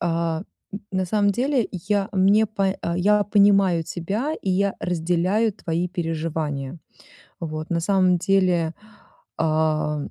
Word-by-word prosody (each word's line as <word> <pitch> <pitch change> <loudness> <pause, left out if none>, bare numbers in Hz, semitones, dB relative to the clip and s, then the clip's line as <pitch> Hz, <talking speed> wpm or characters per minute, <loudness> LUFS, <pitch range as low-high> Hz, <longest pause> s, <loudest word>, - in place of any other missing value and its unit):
а, 165 0 -1 0.3
н 200 - -5
на 185 -1 -1
самом 205 +2 +2
деле, 255 +2 0
я 195 +3 -1
мне, 200 +3 +4
по 195 -2 -1
а 170 0 -2
я 205 +3 +3
понимаю 200 -4 +4
тебя, 210 - -3
и 190 - -2
я 195 +2 +1
разделяю 180 +5 0
твои 170 0 -2
переживания. 160 -4 -3 0.6
Вот, 155 0 -5
на 170 -1 0
самом 185 -1 +2
деле, 180 -3 +1 0.6
ам, 155 -2 0
180 Hz, 130 wpm, -23 LUFS, 165-200 Hz, 0.6 s, мне